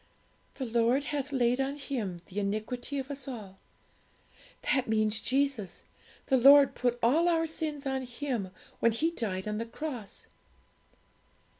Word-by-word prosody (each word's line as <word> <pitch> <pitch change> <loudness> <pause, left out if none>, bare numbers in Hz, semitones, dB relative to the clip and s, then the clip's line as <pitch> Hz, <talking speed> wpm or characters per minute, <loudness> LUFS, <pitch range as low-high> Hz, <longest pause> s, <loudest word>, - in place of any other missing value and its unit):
'"The 265 - -4
Lord 235 +3 +2
hath 285 -1 -3
laid 250 -1 +2
on 275 +1 -1
Him 235 -11 -4
the 195 - -5
iniquity 215 +7 -3
of 270 +1 -4
us 275 -1 -6
all." 205 -7 -8 1.1
That 265 -3 +1
means 215 -1 +1
Jesus; 265 -7 0 0.4
the 265 - +3
Lord 275 +2 +8
put 245 -1 0
all 315 +9 +4
our 330 -1 +2
sins 310 -2 -4
on 265 -1 -1
Him 240 -6 -3 0.3
when 230 - +3
He 320 +9 +1
died 200 - -3
on 210 0 -2
the 230 - -2
cross.' 245 -5 -6
255 Hz, 145 wpm, -30 LUFS, 220-280 Hz, 1.1 s, Lord